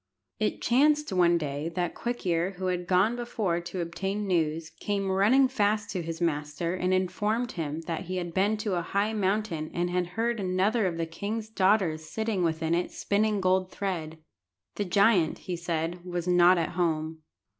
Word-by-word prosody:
It 215 - -1
chanced 295 +2 +3
one 175 -2 +4
day 150 0 -3
that 175 -2 -1
Quick 240 -2 -4
ear, 175 +2 0
who 190 - -4
had 175 0 -4
gone 190 +6 +3
before 215 -7 -1
to 175 +1 -5
obtain 195 +5 -3
news, 160 -3 0
came 200 -2 -1
running 220 +8 +4
fast 210 -4 0
to 185 - -2
his 165 0 -5
master 155 0 -1
and 185 0 -1
informed 210 +6 0
him 160 -2 -4
that 165 +2 -4
he 185 +2 -4
had 175 -2 -3
been 205 +4 +2
to 205 - 0
a - - -2
high 200 +5 0
mountain, 195 -6 -1
and 175 +1 0
had 180 -1 0
heard 235 0 0
another 195 +3 +1
of 170 -2 -3
the 165 - -1
king's 210 +7 -4
daughters 190 -6 +2
sitting 220 +4 -2
within 160 0 0
it 175 +1 0
spinning 210 0 0
gold 185 0 +2
thread. 165 -6 -4 0.6
The 205 - -2
giant, 195 -3 +3
he 180 - -5
said, 170 0 -3
was 175 -1 -4
not 180 0 +6
at 165 -2 0
home. 160 -3 -1
185 Hz, 180 wpm, -28 LUFS, 170-205 Hz, 0.6 s, not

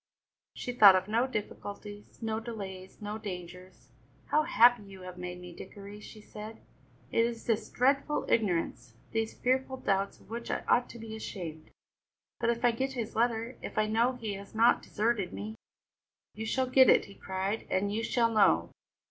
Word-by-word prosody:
She 245 - -4
thought 210 -6 +9
of 185 +1 +1
no 230 +4 +2
difficulties, 205 -2 -7
no 220 0 -1
delays, 200 -4 -8
no 210 +1 -4
dangers. 180 -2 -8 0.4
"How 305 - +4
happy 245 -7 +5
you 195 -2 -12
have 180 -1 -8
made 180 0 -5
me, 180 -1 -10
Dickory!" 200 +3 -10
she 215 +1 -11
said. 215 +1 -9 0.5
"It 230 - +3
is 230 -1 -3
this 225 -2 0
dreadful 275 +4 +1
ignorance, 165 - 0 0.2
these 225 -1 -1
fearful 260 +1 0
doubts 195 -4 0
of - - -19
which 235 +1 -5
I - - -1
ought 245 - +3
to - - -10
be 225 -1 -7
ashamed. 165 -7 -7 0.7
But 235 - +1
if 235 +1 +1
I 240 - +6
get 265 +3 -2
his 235 -4 -4
letter, 230 +1 0
if - - -7
I 215 - +4
know 230 +4 +2
he 225 -5 -4
has 200 +2 -9
not 230 +2 +5
deserted 215 -3 -1
me!" 215 +1 -5 0.8
"You 220 +1 -5
shall 260 +3 +1
get 260 0 +6
it," - - +6
he 200 - -12
cried, 195 +3 -3
"and 200 +2 0
you 220 - 0
shall 230 0 +1
know." 85 - +4
220 Hz, 180 wpm, -30 LUFS, 195-235 Hz, 0.8 s, thought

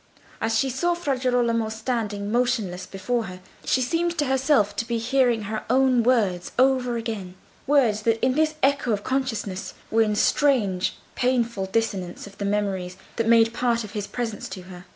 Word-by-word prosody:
As 225 0 +1
she 265 +3 +1
saw 345 +7 0
Fra 295 -6 -1
Girolamo 240 -3 +1
standing 220 -3 -3
motionless 230 -7 0
before 225 +4 -2
her, 185 -1 -8 0.2
she 255 - +1
seemed 335 +5 0
to 295 - +1
herself 265 -6 +2
to 230 - -2
be 235 - -1
hearing 240 -1 +2
her 215 +1 -4
own 255 -1 +4
words 215 -8 +1
over 255 -2 +3
again; 215 -6 -5 0.3
words 250 -7 +3
that 225 0 +1
in 255 - +2
this 310 +2 +1
echo 275 -4 +2
of 205 -1 -2
consciousness 225 -8 -2 0.2
were 225 - +4
in 210 -1 +2
strange, 210 -8 +2 0.2
painful 235 -6 0
dissonance 190 -4 -2
with 200 -1 -14
the 200 - -2
memories 195 -3 -1 0.2
that 230 -1 0
made 230 0 +5
part 235 -1 +1
of 210 - -8
his 205 -2 -4
presence 230 -4 -4
to 190 -1 -7
her. 180 0 -11
230 Hz, 175 wpm, -24 LUFS, 205-255 Hz, 0.3 s, made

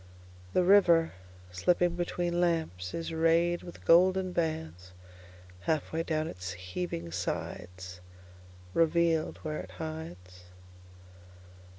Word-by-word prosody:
The 180 - +4
river, 175 -4 +5 0.4
slipping 175 - +2
betweenLamps, 170 - -1
is 165 0 -4
rayed 165 +2 +3
with 175 - -11
golden 185 +2 +5
bandsHalf 90 - -4
way 160 - 0
down 155 -1 -1
its 90 - -6
heaving 90 - -5
sides; 90 +1 -5 0.7
Revealed 165 +1 +2
where 155 -1 -3
it - - -8
hides. 90 - -8
160 Hz, 90 wpm, -30 LUFS, -, 0.7 s, river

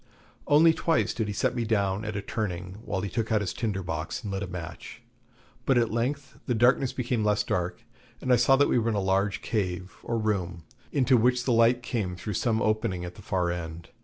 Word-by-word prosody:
Only 160 +3 +6
twice 165 0 +1
did 110 -2 -2
he 105 - -3
set - - +1
me 120 - 0
down 100 -2 0
at 110 -1 -4
a 100 - -3
turning, 95 -4 -4
while 100 -2 -2
he 100 - -2
took 115 -1 -2
out 110 -1 +3
his 95 - -2
tinder 105 -5 -2
box 80 +8 -4
and 105 - -4
lit 95 - -2
a 100 - -3
match; 85 -2 -8 0.6
but 135 - +3
at 115 -2 +2
length 135 +4 -2
the 125 - +1
darkness 125 +3 +3
became 120 -3 -1
less 105 0 +2
dark, 90 -3 -2 0.4
and 130 - +2
I - - +8
saw 125 +3 +5
that 145 +1 +4
we - - +3
were 115 0 0
in 110 - 0
a - - +1
large 95 +1 0
cave 95 -3 -2
or 115 - -2
room, 95 -6 -1 0.3
into 130 -2 +4
which 125 +2 +3
the 125 - +1
light 115 +2 +4
came 105 -8 -2
through 105 +4 -5
some 110 +3 +1
opening 110 -5 0
at 90 - -7
the 105 - -13
far 90 -3 0
end. 85 -1 -6
105 Hz, 225 wpm, -27 LUFS, 95-120 Hz, 0.6 s, I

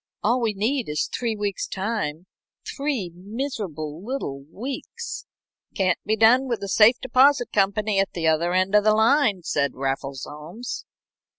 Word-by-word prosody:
All 240 +4 +2
we 220 -3 0
need 235 - 0
is 150 0 0
three 230 -3 -1
weeks' 205 -2 -2
time 190 -6 -3 0.4
three 275 -11 -2
miserable 185 - -5
little 205 - -4
weeks." 255 +8 -6 0.5
"Can't 185 -2 +1
be 215 - +2
done 235 +5 +5
with 235 -4 -2
a - - -3
safe 220 +5 +5
deposit 260 0 +3
company 200 +1 +2
at 195 - 0
the 170 -2 -3
other 160 +2 +2
end 185 +2 +1
of 210 0 +5
the 215 0 +4
line," 220 - +3
said 140 -3 0
Raffles 135 0 -3
Holmes. 165 +11 -7
205 Hz, 155 wpm, -24 LUFS, 170-235 Hz, 0.5 s, done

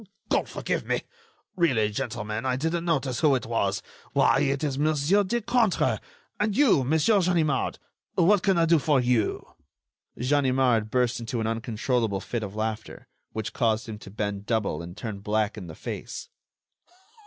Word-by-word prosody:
"God - - +1
forgive - - -2
me!... - - -1 0.5
really, 125 - +2
gentlemen, 105 +1 -3
I 130 -1 0
didn't 165 +5 -1
notice 140 -7 0
who 150 -4 +4
it 125 - -2
was. 100 -4 -1 0.3
Why, - - +4
it 140 +2 0
is 140 -2 -1
Monsieur 155 +6 +3
Decointre!... 235 +1 +1 0.4
and 210 0 0
you, 255 - +5
Monsieur 160 - +3
Ganimard. 165 -6 +1 0.4
What 195 +3 +4
can 195 -1 +2
I 165 - +4
do 165 -1 +4
for 145 -1 +2
you!" 120 -3 +1 0.7
Ganimard 130 -4 +2
burst 125 0 +1
into 115 +1 -3
an 110 - -1
uncontrollable 115 -1 -1
fit 120 +4 -4
of 105 -1 -6
laughter, 110 0 -4 0.2
which 110 0 -4
caused 115 -1 +1
him 110 -2 -6
to 105 - -11
bend 100 0 -4
double 105 -9 0
and 85 +2 -9
turn 110 -4 -5
black 105 +1 0
in 100 -5 -8
the 80 - -9
face. - - -6
125 Hz, 160 wpm, -26 LUFS, 110-155 Hz, 0.7 s, you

